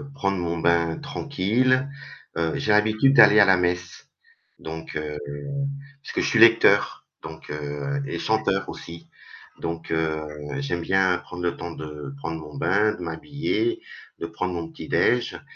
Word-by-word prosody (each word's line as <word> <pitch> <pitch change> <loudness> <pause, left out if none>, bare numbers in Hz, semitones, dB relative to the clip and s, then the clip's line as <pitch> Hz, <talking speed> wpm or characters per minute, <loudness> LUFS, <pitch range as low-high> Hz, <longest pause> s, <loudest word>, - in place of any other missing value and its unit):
prendre 100 -7 0
mon 85 -1 -2
bain 85 0 +2
tranquille, 130 - 0 0.5
heu, 80 -1 0
j'ai 105 - 0
l'habitude 110 +6 +4
d'aller 110 -3 +8
à 100 - +8
la 95 -1 +5
messe, 90 0 -2 0.5
donc 80 0 -8
heu, 75 -1 -4 0.9
puisque - - -3
je - - +1
suis 115 - +2
lecteur, 115 -3 +5 0.2
donc 80 0 -10
heu, 75 - -3
et - - -4
chanteur 100 -3 0
aussi, 85 0 -9 0.5
donc 85 0 -5
heu, 80 -1 0 0.4
j'aime 135 -12 -2
bien 95 0 +2
prendre 90 -1 -9
le 85 - -1
temps 85 0 -6
de 75 -3 -8
prendre 80 +3 -4
mon 75 -1 -10
bain, 105 +5 +2
de - - -11
m'habiller, 150 - -2 0.4
de - - -4
prendre 90 +2 -3
mon 85 -1 -4
petit - - -9
déj' 120 0 +1
90 Hz, 155 wpm, -24 LUFS, 80-110 Hz, 0.9 s, d'aller